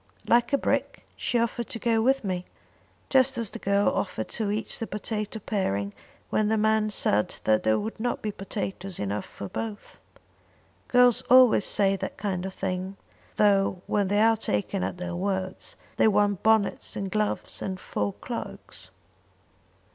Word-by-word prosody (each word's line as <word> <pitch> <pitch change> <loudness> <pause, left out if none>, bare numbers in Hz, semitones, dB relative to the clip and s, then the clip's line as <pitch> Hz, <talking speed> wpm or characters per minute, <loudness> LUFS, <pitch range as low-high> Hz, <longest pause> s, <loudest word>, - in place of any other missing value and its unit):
"Like 240 +2 +4
a 280 - +4
brick, - - -1
she 245 - 0
offered 235 0 -1
to - - -4
go 230 -1 +1
with 265 +3 +2
me, 185 -2 -2 0.7
just 265 0 +4
as 230 -3 -3
the - - -7
girl 200 +1 +2
offered 110 - -2
to 220 -3 -2
eat 215 +2 -2
the 225 - -3
potato 210 +1 -4
parings 100 - -2 0.4
when 215 - +2
the 220 +1 +2
man 215 0 +2
said 105 - +1
that 110 0 +3
there 110 0 +2
would 220 +1 -4
not 245 +2 -1
be 215 - -1
potatoes 195 -2 -5
enough 100 0 -2
for 100 - -8
both. 215 - -6 0.9
Girls 245 -1 +5
always 250 -4 +7
say 195 -1 +2
that - - -5
kind 190 -3 -2
of 190 - -7
thing, 185 +1 -3 0.4
though, 195 -3 +3
when 205 -2 +1
they 205 +2 +3
are 225 0 +4
taken 185 - -1
at - - -3
their 180 -1 -4
words, 190 0 -3 0.2
they - - +5
want 205 -2 +2
bonnets 220 -2 +2
and 195 -1 -3
gloves 215 -1 -2
and 190 -1 -3
fur 105 - -2
cloaks." - - -7
205 Hz, 165 wpm, -27 LUFS, 185-220 Hz, 0.9 s, always